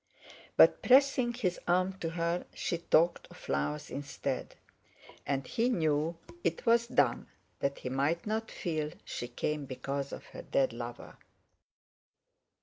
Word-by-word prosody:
But, - - +7
pressing 260 -2 +5
his 185 -8 -1
arm 185 +2 +3
to 165 - -2
her, 170 +1 -1
she 170 - -2
talked 170 0 +3
of - - -14
flowers 75 +2 -2
instead, 140 -2 -4 0.7
and 135 -1 0
he 235 +2 +1
knew 160 -5 +1 0.3
it - - -1
was 235 0 +4
done - - +2 0.3
that 140 0 -1
he 125 - -5
might 140 +6 0
not 220 +1 -2
feel 155 -4 -3
she 120 - -4
came 145 +4 -2
because 140 +1 -4
of - - -7
her - - -6
dead 135 -3 +1
lover. 120 0 -7
160 Hz, 140 wpm, -31 LUFS, 140-185 Hz, 0.7 s, But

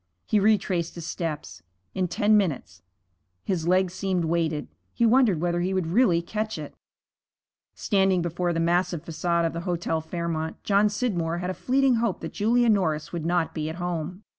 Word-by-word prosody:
He 215 - +2
retraced 195 -5 +1
his 170 -2 -7
steps. 165 -3 -5 0.3
In 185 -1 0
ten 210 +3 +2
minutes 185 -10 -1 0.6
His 170 -4 -2
legs 185 0 +2
seemed 185 -3 -1
weighted. 160 -2 -1 0.3
He 235 - +2
wondered 230 -7 +4
whether 175 +1 0
he 185 +2 -1
would 185 -3 0
really 175 -1 +3
catch 215 +4 -3
it. - - -7 1.0
Standing 190 -3 +2
before 175 +1 -1
the 165 - -1
massive 170 -1 0
façade 170 +1 0
of 165 - -1
the 170 - -3
Hotel 170 -2 -2
Fairmont, 160 -1 -4
John 205 +1 +3
Scidmore 180 -7 -1
had 180 +1 -2
a - - -4
fleeting 260 +3 +2
hope 225 -4 -1
that 165 - -6
Julia 235 +3 +2
Norris 180 -9 +1
would 165 -2 -3
not 175 -1 0
be 155 -1 -3
at 160 - -5
home. 175 +2 -4
175 Hz, 175 wpm, -25 LUFS, 165-200 Hz, 1.0 s, wondered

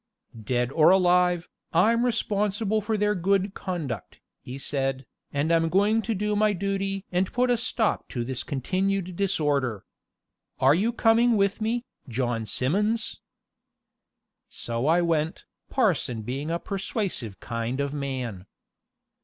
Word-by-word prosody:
"Dead 120 +3 0
or 155 +2 +5
alive, 180 -1 +3 0.3
I'm 225 +8 +4
responsible 215 -2 0
for 215 +1 -1
their 210 0 +2
good 195 +1 +1
conduct," 155 - -5 0.2
he 125 +2 -7
said, 135 -1 -2 0.3
"and 145 +3 0
I'm 165 -1 +3
going 205 +5 +3
to 225 0 -2
do 210 +2 -1
my 210 0 +3
duty 195 0 -2
and 185 +1 0
put 250 0 +2
a - - +4
stop 225 -2 -1
to 120 -2 -3
this 130 0 -2
continued 185 +6 -1
disorder. 145 - 0 0.7
And 140 +6 +5
you 225 - +2
are - - -3
coming 230 0 +4
with 200 +2 +1
me, 235 +3 -1 0.2
John 120 -2 -1
Simmons." 210 - 0 1.3
So 120 +3 -3
I 170 +2 +4
went, 160 -1 -1 0.2
parson 115 -3 +1
being 135 +7 -4
a 170 - 0
persuasive 195 - -3
kind 115 +2 -3
of 140 0 -1
man. 130 -9 -4
180 Hz, 135 wpm, -26 LUFS, 135-210 Hz, 1.3 s, or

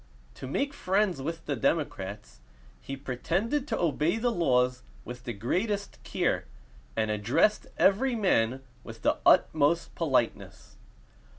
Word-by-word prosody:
To 95 - -8
make 280 - -1
friends 190 - 0
with 165 +3 -5
the 145 - -1
democrats, 105 - -2 0.4
he 135 - -6
pretended 175 - -1
to - - -1
obey 165 +3 +1
the 240 +2 +1
laws 125 - +2 0.2
with 125 +1 -9
the 120 - -3
greatest 195 - -2
care, - - -1 0.5
and 110 -1 0
addressed 110 - +2
every 240 +6 +3
man 135 - +1 0.2
with - - -11
the - - +2
utmost 160 +2 +3
politeness. 130 -8 -1
150 Hz, 125 wpm, -28 LUFS, 125-200 Hz, 0.5 s, every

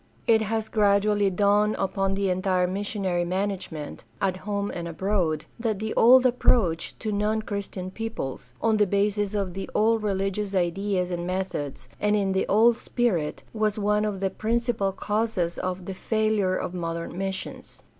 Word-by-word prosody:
It 225 -1 +4
has 220 +1 -1
gradually 205 -1 +3
dawned 205 +2 +3
upon 195 0 0
the 195 -1 +1
entire 185 0 +1
missionary 190 -1 -1
management, 180 -4 -3 0.2
at 190 -2 +1
home 200 +1 -3
and 170 -1 -5
abroad, 170 -3 -1
that 225 -3 0
the 220 +2 -3
old 255 +2 +7
approach 230 -8 +2
to 215 - -3
non 210 +2 0
Christian 200 -3 -5
peoples, 225 - -5
on 225 -1 +3
the 210 -1 +3
basis 205 +1 0
of 195 -3 -1
the 195 +1 -5
old 225 +1 +3
reHgious 195 0 -1
ideas 185 +1 0
and 175 0 -3
methods, 180 -9 -3
and 210 0 +2
in 200 -2 +1
the 190 0 0
old 225 +3 +5
spirit, 190 -15 -1
was 215 -1 0
one 210 0 +2
of 210 -2 -2
the 195 -1 0
principal 230 -3 0
causes 205 -3 -1
of 185 0 -3
"the 195 - -4
failure 215 -2 +1
of 180 - -3
modern 170 -1 -4
missions." 190 0 -5
200 Hz, 160 wpm, -26 LUFS, 185-215 Hz, 0.2 s, old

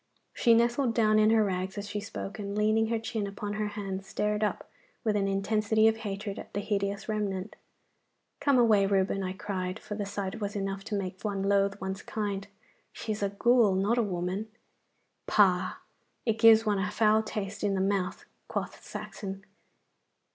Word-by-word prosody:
She 230 -1 +4
nestled 235 +1 +2
down 215 -2 +4
in 215 0 +5
her 220 -1 +5
rags 190 -1 -2
as 205 0 -4
she 210 - -3
spoke, 205 0 -6
and 200 0 -4
leaning 215 +1 +3
her 230 0 0
chin 220 -2 -3
upon 205 +1 -5
her 210 0 -1
hands 195 -1 -4
stared 210 +2 -1
up 210 - -1 0.4
with 215 -3 +1
an 200 -1 +1
intensity 215 +2 +2
of 225 0 +3
hatred 205 -2 -5
at - - -10
the - - +1
hideous 200 -1 -2
remnant. 205 -2 -2 0.8
'Come 280 -3 +3
away, 215 -5 +5
Reuben,' 195 0 +1
I 185 -1 -2
cried, 190 -1 -3
for 210 - -7
the 205 -1 -3
sight 200 +1 -4
was 205 0 -3
enough 195 -1 -3
to 220 - -3
make 190 -2 -4
one 200 -2 -2
loathe 200 0 +2
one's 190 0 -4
kind. 200 -2 -3 0.4
'She 220 - -5
is 210 - -3
a 200 - +1
ghoul, 220 0 +4
not 205 +6 +2
a - - +5
woman.' 185 +1 -2 0.8
'Pah! 185 -3 +3 0.5
it 225 -2 0
gives 225 0 +7
one 205 -2 +1
a 205 +2 0
foul 215 0 +3
taste 210 -2 -5
in 200 -1 +1
the - - 0
mouth,' 190 -1 -1 0.2
quoth - - -4
Saxon. 195 -1 -7
205 Hz, 185 wpm, -29 LUFS, 195-215 Hz, 0.8 s, gives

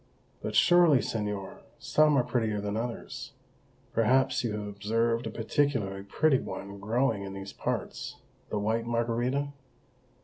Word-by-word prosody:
"But - - -4
surely, 175 -5 +6
señor, 105 -5 -3 0.2
some 150 -1 +3
are 125 - +4
prettier 110 -4 0
than 100 0 -3
others. 125 +4 -5 0.6
Perhaps 130 +4 +3
you 115 -3 -1
have 105 -1 -4
observed 115 +3 0
a - - -2
particularly 115 -5 0
pretty 135 +8 +2
one 100 +1 -7
growing 110 +1 +1
in 95 0 -6
these 95 0 -7
parts - - -3 0.3
the 105 - -1
white 110 +3 0
margarita?" 120 +4 0
115 Hz, 135 wpm, -29 LUFS, 105-130 Hz, 0.6 s, surely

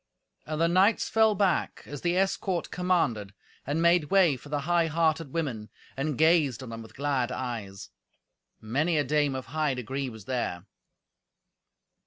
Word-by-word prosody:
And 155 0 -3
the 165 - +3
knights 190 +6 +3
fell 220 -1 +4
back 190 -2 0
as 145 -1 -8
the 175 +1 0
escort 190 -1 -1
commanded, 120 - 0 0.3
and 155 +4 0
made 170 -2 +4
way 175 -3 +4
for 140 +3 -13
the 145 -1 -1
high 170 +2 +2
hearted 160 -2 0
women, 130 -10 -3 0.3
and 140 0 -2
gazed 155 -6 +3
on 125 - -8
them 115 0 -7
with 110 - -13
glad 135 -3 -1
eyes. 110 - -5 0.7
Many 145 +10 0
a 145 - +2
dame 145 0 +1
of 130 - -5
high 150 -1 -1
degree 130 +2 -4
was 110 -4 -11
there. 110 -8 -3
145 Hz, 160 wpm, -28 LUFS, 125-170 Hz, 0.7 s, fell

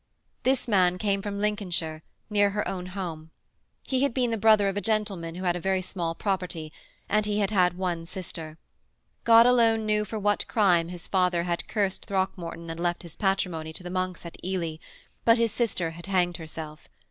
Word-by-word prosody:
This 260 -1 +1
man 180 -4 +3
came 200 0 0
from 200 0 -4
Lincolnshire, 180 -7 -1 0.3
near 205 -1 +3
her 210 +1 -2
own 180 -1 -4
home. 170 -4 -5 0.5
He 260 -1 0
had 280 -4 +1
been 250 -3 +1
the - - +1
brother 215 -1 +5
of 195 - -1
a 205 - -1
gentleman 205 -7 -1
who 185 - -6
had 175 -1 +2
a - - -2
very 190 +1 0
small 170 -3 -3
property, 180 -6 -3 0.3
and 210 0 +2
he 210 0 0
had 205 -1 +1
had 180 -3 +3
one 175 -3 -2
sister. 165 -4 -7 0.7
God 230 0 +8
alone 230 -3 +4
knew 210 0 +2
for 215 +2 -5
what 205 0 +1
crime 180 -8 +3
his 175 -2 -8
father 180 -2 +2
had 175 -1 -2
cursed 200 -3 -1
Throckmorton 180 -4 -2
and 165 - -7
left 175 +1 -1
his 170 -2 -10
patrimony 180 -5 -1
to 180 - -9
the 175 - -6
monks 185 -1 -2
at 170 - -10
Ely 175 -4 -2 0.5
but 230 0 +6
his 230 -1 +2
sister 195 -9 -1
had 170 +2 -10
hanged 175 -3 +1
herself. 155 -1 -8
185 Hz, 195 wpm, -27 LUFS, 170-210 Hz, 0.7 s, God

